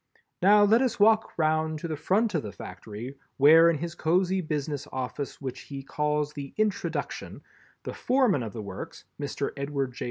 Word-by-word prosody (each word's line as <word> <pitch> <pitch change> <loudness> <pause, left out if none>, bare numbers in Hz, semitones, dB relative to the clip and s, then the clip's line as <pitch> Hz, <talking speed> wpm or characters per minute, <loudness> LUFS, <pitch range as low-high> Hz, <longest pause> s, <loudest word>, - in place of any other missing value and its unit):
Now 205 +3 +6
let 220 +4 +5
us 250 -4 0
walk 220 +1 +4
round 155 0 +1
to 160 - -5
the 160 - -3
front 205 +8 +1
of 160 - +1
the 105 - -7
Factory, 115 +8 -9 0.2
where 160 +4 +7
in 165 - +1
his 170 +3 -5
cosy 180 +4 +1
business 145 -3 -3
office 130 +2 -4
which 130 -2 -5
he 135 +1 -8
calls 150 +1 -1
the 140 -2 -8
"Introduction" 215 -2 -2 0.4
the - - -5
Foreman 245 - +2
of 110 -3 -5
the 110 +1 -6
works, 100 -2 -8 0.2
Mr. 140 0 -3
Edward 140 -2 -3
J. - - -11
150 Hz, 180 wpm, -27 LUFS, 140-185 Hz, 0.4 s, where